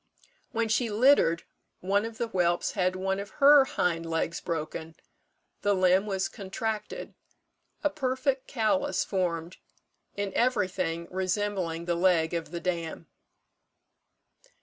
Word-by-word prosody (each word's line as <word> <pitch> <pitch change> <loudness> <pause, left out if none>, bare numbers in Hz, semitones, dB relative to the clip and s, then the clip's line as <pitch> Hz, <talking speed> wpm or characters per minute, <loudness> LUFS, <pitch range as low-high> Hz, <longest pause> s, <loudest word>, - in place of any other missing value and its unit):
When 230 -2 0
she 225 +2 +1
littered, 215 -6 +4 0.4
one 200 +3 +1
of 225 -1 -7
the 235 - 0
whelps 175 -4 +1
had 185 -2 0
one 190 +1 -1
of 200 - -7
her 285 -1 +8
hind 170 -9 0
legs 165 +1 -1
broken 160 0 -4 0.7
the 205 0 +2
limb 185 +2 +3
was 195 -2 0
contracted 215 +1 -5 0.7
a 295 - +3
perfect 265 -2 -1
callus 280 +5 +1
formed, 175 -2 -2 0.6
in 200 -1 -2
everything 185 -8 0
resembling 185 -2 -1
the 175 - 0
leg 170 -2 +2
of 165 -2 -3
the 170 +1 -5
dam. 170 -2 -3
190 Hz, 125 wpm, -28 LUFS, 170-220 Hz, 0.7 s, her